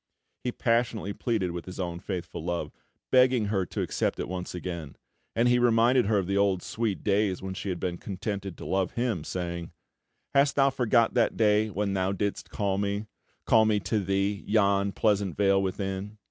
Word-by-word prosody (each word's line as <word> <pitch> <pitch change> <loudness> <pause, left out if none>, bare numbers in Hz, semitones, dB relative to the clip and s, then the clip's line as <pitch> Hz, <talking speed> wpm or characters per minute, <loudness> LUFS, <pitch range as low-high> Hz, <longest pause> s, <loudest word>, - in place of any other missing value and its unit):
He 125 - -1
passionately 115 -4 0
pleaded 100 -8 -1
his 95 +1 -8
own 85 -2 -3
faithful 85 -4 -5
love, 85 0 -2 0.4
begging 125 -3 +5
her 95 -3 0
to - - -2
accept - - -1
it - - -2
once 90 0 -5
again; 85 -5 -5 0.4
and 115 +2 +3
he 125 0 +4
reminded 120 0 +4
her 105 -1 +3
of 95 - 0
the 100 +2 0
old 95 -2 +2
sweet 110 -4 -2
days 100 -2 +1
when 95 0 -4
she 100 - -5
had 90 -2 -3
been 90 -1 -3
contented 100 -1 -5
to - - -8
love 95 -1 0
him, 120 -9 -1
saying: 85 -1 -4 0.6
"Hast 140 +1 +4
thou 135 -1 +4
forgot 120 -3 +2
that 120 - +2
day 110 -1 +3
when 100 0 -1
thou 95 0 0
didst 100 +1 -3
call 100 -2 -1
me, 100 +1 -1 0.4
Call 110 -1 +5
me 105 -1 +2
to 110 +1 0
thee, 100 +1 -1
yon 100 -2 +3
pleasant 100 -3 +1
vale 100 -1 +4
within? 95 +2 -3
100 Hz, 185 wpm, -28 LUFS, 95-110 Hz, 0.6 s, begging